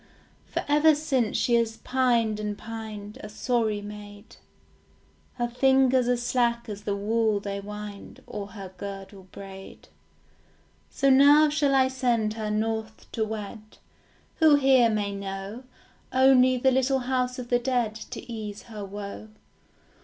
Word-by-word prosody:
For - - -3
ever 300 +2 +5
since 270 -7 0
she 240 - +1
has 225 -1 -1
pined 235 -4 +1
and 210 -1 -3
pined, 215 -2 -8
A 210 - -8
sorry 215 -2 -1
maid; 205 0 -11 1.0
Her 240 -1 -1
fingers 260 0 +3
are 245 0 +2
slack 240 -1 0
as 205 -1 -7
the 200 - -1
wool 215 +1 +1
they 200 0 -4
wind, 210 0 -9
Or 205 -1 -6
her 195 -3 -9
girdle 195 -1 -8
braid. 195 -1 -11 1.0
So 275 -1 +2
now 290 +3 +7
shall 290 -2 +1
I 260 -1 +4
send 240 -5 0
her 220 -1 -4
north 220 +1 -3
to 225 - -1
wed, 215 0 -7 0.6
Who 315 -3 +6
here 265 -4 +5
may 205 -2 -1
know 195 +4 -6 0.5
Only 260 -1 +5
the 265 +2 +3
little 265 +1 +1
house 250 0 -1
of 245 -1 -7
the 245 - +3
dead 245 -3 0
To 220 - -9
ease 215 -3 -6
her 215 -3 -8
woe? 200 +2 -7
225 Hz, 145 wpm, -26 LUFS, 210-255 Hz, 1.0 s, now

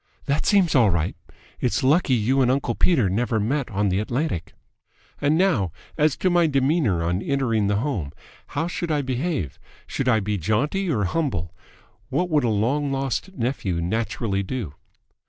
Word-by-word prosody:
"That 140 +1 0
seems 190 -5 +4
all 120 -6 +5
right. 85 -1 0 0.4
It's 125 +3 0
lucky 140 0 +3
you 125 +4 +2
and 125 - +3
uncle 130 -2 +1
Peter 130 - +3
never 110 +4 0
met 130 +5 -1
on 100 -1 0
the 95 +1 +1
Atlantic." 120 - -2 0.7
"And 145 +2 +3
now 155 - +2 0.2
as 150 -3 +2
to 185 - +1
my 175 -1 +4
demeanour 135 - +1
on 90 +3 0
entering 115 -7 0
the 100 - +1
home? 105 - -2 0.5
How 160 - +1
should 175 -1 -3
I 150 -2 +1
behave? 130 - -2 0.3
Should 130 -2 -1
I 110 -3 +4
be 105 0 -2
jaunty 140 - 0
or 115 -10 +1
humble? 90 - -1 0.6
What 180 -1 -1
would 150 -3 +3
a 120 - +2
long 130 +7 0
lost 135 +8 -2
nephew 115 - -1
naturally 100 +2 -1
do?" 100 - -4
125 Hz, 170 wpm, -23 LUFS, 105-150 Hz, 0.7 s, all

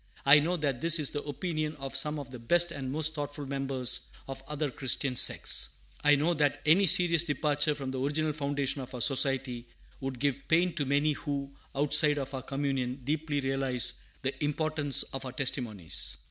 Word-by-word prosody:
I 140 +2 +8
know 170 +4 0
that 140 -5 -2
this 165 0 +5
is 150 -3 +2
the 145 - -3
opinion 155 +1 -3
of 135 -1 -7
some 150 +3 +3
of 140 -3 -8
the 125 - -8
best 175 +8 +4
and 135 -4 -5
most 155 +2 0
thoughtful 145 -1 -5
members 135 -2 -1 0.2
of 135 0 -7
other 150 -1 -2
Christian 130 0 -1
sects. 60 - +1 0.3
I 150 0 +6
know 155 +5 +1
that 145 -2 +1
any 180 +6 +5
serious 170 0 +5
departure 150 -1 0
from 135 -2 -5
the 130 - -4
original 150 +3 0
foundation 140 -1 -1
of 130 0 -9
our 125 - -5
Society 130 -2 +1 0.3
would 135 -2 -5
give 140 +1 -2
pain 170 +2 +3
to 150 -3 -2
many 145 +3 +2
who, 140 -2 -5 0.2
outside 150 +1 +4
of 135 -1 -4
our 130 - -4
communion, 135 -1 -3
deeply 150 +1 -1
realize 135 -2 0 0.2
the 135 +3 -3
importance 150 -1 0
of 135 0 -7
our 130 -1 -7
testimonies. 120 - -2
140 Hz, 185 wpm, -29 LUFS, 135-150 Hz, 0.3 s, I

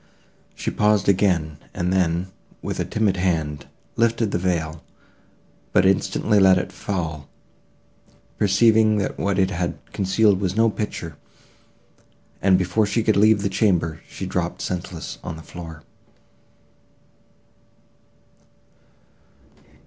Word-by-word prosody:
She - - -3
paused 105 -1 +2
again, 90 -6 +2 0.2
and 90 +1 -1
then, 90 0 0 0.3
with - - -4
a - - 0
timid 105 -3 0
hand, 80 -6 -1 0.3
lifted 115 -2 +1
the 85 - 0
veil; 80 -3 -2 0.9
but 95 - +4
instantly 100 +2 +2
let 95 -1 +6
it 90 - -3
fall—perceiving 100 +5 -1
that 100 - -2
what 100 0 0
it 95 -1 +2
had 90 -1 -2 0.2
concealed 95 +1 +2
was 95 -1 -1
no 115 0 +3
picture, 85 -8 -5 1.2
and, 95 -1 +4
before 90 +4 +1
she 110 +3 0
could 110 - +2
leave 105 0 +4
the - - +1
chamber, 95 -5 0
she - - -6
dropped - - -3
senseless 90 -2 -5
on - - -5
the 80 - -11
floor. 80 -3 -10
95 Hz, 115 wpm, -22 LUFS, 85-105 Hz, 1.2 s, let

